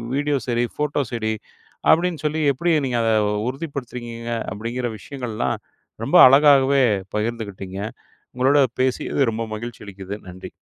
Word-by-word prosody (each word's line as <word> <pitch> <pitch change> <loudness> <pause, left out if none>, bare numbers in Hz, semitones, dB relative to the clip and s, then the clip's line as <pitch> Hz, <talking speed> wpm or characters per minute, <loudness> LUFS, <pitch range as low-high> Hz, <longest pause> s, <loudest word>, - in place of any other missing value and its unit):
Video 145 0 +1
சரி. 120 0 +1
Photo 150 -1 0
சரி. 110 -2 -1 0.6
அப்படின்னு 170 0 +3
சொல்லி 155 +1 0
எப்படி 170 +6 -1 0.2
நீங்கள் 120 -2 0
அதை 115 0 +2 0.4
உறுதிப்படுத்துறுங்கீங்க? 125 -5 -6 0.2
அப்படிங்கிற 120 +5 -3
விஷயங்கள்லாம் 115 +1 -3 0.5
ரொம்ப - - +3
அழகாகவே 140 0 +5 0.3
பகிர்ந்துகிட்டிங்க. 105 -4 -4 0.6
உங்களோட 130 +3 +3 0.2
பேசியது 130 +2 0
ரொம்ப 115 +1 -3
மகிழ்ச்சி 120 +1 -8
அளிக்குது. 100 0 -7
நன்றி. 90 +1 -9
120 Hz, 120 wpm, -22 LUFS, 110-140 Hz, 0.6 s, அழகாகவே